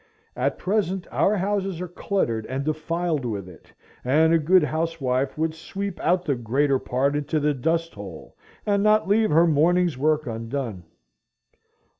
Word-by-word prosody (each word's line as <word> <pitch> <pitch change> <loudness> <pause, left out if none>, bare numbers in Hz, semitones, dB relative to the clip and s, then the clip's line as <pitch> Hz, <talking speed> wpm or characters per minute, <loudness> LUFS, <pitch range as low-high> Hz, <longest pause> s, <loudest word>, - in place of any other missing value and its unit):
At - - -1
present 190 -2 -1
our 210 +1 +2
houses 195 -2 -1
are 180 - -4
cluttered 140 - -2
and 135 +2 -3
defiled 155 0 -1
with 105 -6 -4
it, 90 -3 -15 0.3
and 155 +6 +3
a 165 - +5
good 175 +3 +4
housewife 150 -5 -1
would 160 0 0
sweep 195 +4 -6
out 180 +2 +1
the 145 - +1
greater 135 +3 +1
part 135 +4 0
into 150 +1 -1
the 150 0 +1
dust 165 +5 -1
hole, 95 -6 -10 0.3
and 200 -1 +2
not 215 0 +3
leave 215 +2 +3
her 165 +3 +5
morning's 170 0 +2
work 155 +1 +2
undone. 115 -4 -4
155 Hz, 155 wpm, -24 LUFS, 130-180 Hz, 0.3 s, a